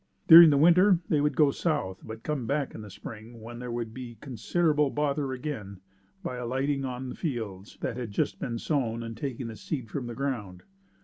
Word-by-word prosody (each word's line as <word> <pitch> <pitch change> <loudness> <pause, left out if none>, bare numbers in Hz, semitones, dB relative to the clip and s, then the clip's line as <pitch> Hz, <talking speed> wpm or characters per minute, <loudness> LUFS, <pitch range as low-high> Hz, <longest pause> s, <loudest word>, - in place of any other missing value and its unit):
During 165 0 +11
the 145 - +3
winter 175 +5 +6
they 150 -3 +3
would 150 0 +1
go 150 -3 +4
south, 140 - -2
but 110 0 -9
come 145 -6 -2
back 140 +1 -1
in - - -8
the 105 - -9
spring 110 +4 -10
when 120 +2 -9
they 125 - -6
would 120 -2 -4
be 120 -2 -8
considerable 150 +4 +1
bother 145 -1 -1
again, 125 -8 -5 0.4
by 125 - -4
alighting 135 +3 -1
on 125 0 -4
fields 110 - -5
that 120 - -3
had 120 -3 -4
just 100 -1 -1
been 115 -1 -3
sown 115 -4 -1
and 115 0 -6
taking 130 0 -4
the 115 -1 -6
seed 125 -3 -5
from 130 -4 -4
the 120 - -6
ground. 110 -10 -4
125 Hz, 195 wpm, -28 LUFS, 115-145 Hz, 0.4 s, During